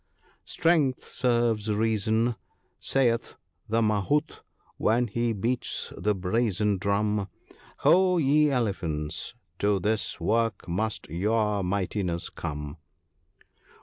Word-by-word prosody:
— -, -, -35 dB
"Strength 160 Hz, -7 st, +2 dB
serves 120 Hz, -3 st, 0 dB
Reason. 110 Hz, +2 st, +1 dB, 0.5 s
Siiilh 120 Hz, -3 st, +1 dB, 0.3 s
the 115 Hz, +1 st, +2 dB
Mahout, 110 Hz, +9 st, 0 dB, 0.4 s
when 120 Hz, +3 st, +2 dB
he 120 Hz, +1 st, -1 dB
beats 115 Hz, +4 st, -2 dB
the 105 Hz, 0 st, 0 dB
brazen 100 Hz, +1 st, 0 dB
drum, 100 Hz, +1 st, 0 dB, 0.3 s
' -, -, -25 dB
Ho! 185 Hz, 0 st, +5 dB
ye 150 Hz, 0 st, +4 dB
elephants, 90 Hz, -, -2 dB, 0.2 s
to 100 Hz, -1 st, +2 dB
this 105 Hz, -1 st, -1 dB
work 110 Hz, +3 st, 0 dB
must 105 Hz, +5 st, -2 dB
your 105 Hz, +5 st, 0 dB
mightinesses 90 Hz, -2 st, -2 dB
come.' 75 Hz, 0 st, -5 dB
110 Hz, 105 wpm, -27 LUFS, 100-120 Hz, 0.5 s, Ho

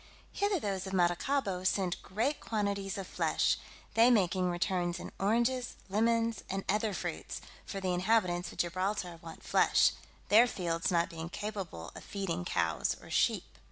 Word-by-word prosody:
Hither 405 Hz, -2 st, +1 dB
those 195 Hz, -5 st, -2 dB
of 190 Hz, -, -6 dB
Maracaibo 185 Hz, +3 st, +1 dB
send 185 Hz, -1 st, 0 dB
great 235 Hz, +10 st, -1 dB
quantities 200 Hz, -3 st, -1 dB
of 195 Hz, -, -4 dB
flesh, -, -, +1 dB, 0.4 s
they 230 Hz, +2 st, +6 dB
making 185 Hz, -5 st, +3 dB
returns 175 Hz, 0 st, 0 dB
in -, -, -7 dB
oranges, 235 Hz, +5 st, +1 dB
lemons, 230 Hz, +1 st, +1 dB
and 195 Hz, 0 st, -2 dB
other 210 Hz, +2 st, +1 dB
fruits; -, -, -4 dB, 0.3 s
for 195 Hz, -, -4 dB
the 185 Hz, -1 st, 0 dB
inhabitants 180 Hz, -2 st, +1 dB
of -, -, -13 dB
Gibraltar 180 Hz, 0 st, -1 dB
want 165 Hz, -1 st, -10 dB
flesh, -, -, +4 dB, 0.4 s
their 230 Hz, +4 st, +7 dB
fields 170 Hz, -6 st, -1 dB
not 170 Hz, -1 st, +2 dB
being 165 Hz, 0 st, -6 dB
capable 190 Hz, -, -5 dB
of -, -, -9 dB
feeding 180 Hz, -3 st, -3 dB
cows 80 Hz, -, 0 dB
or -, -, -13 dB
sheep. -, -, +2 dB
195 Hz, 155 wpm, -32 LUFS, 175-215 Hz, 0.4 s, their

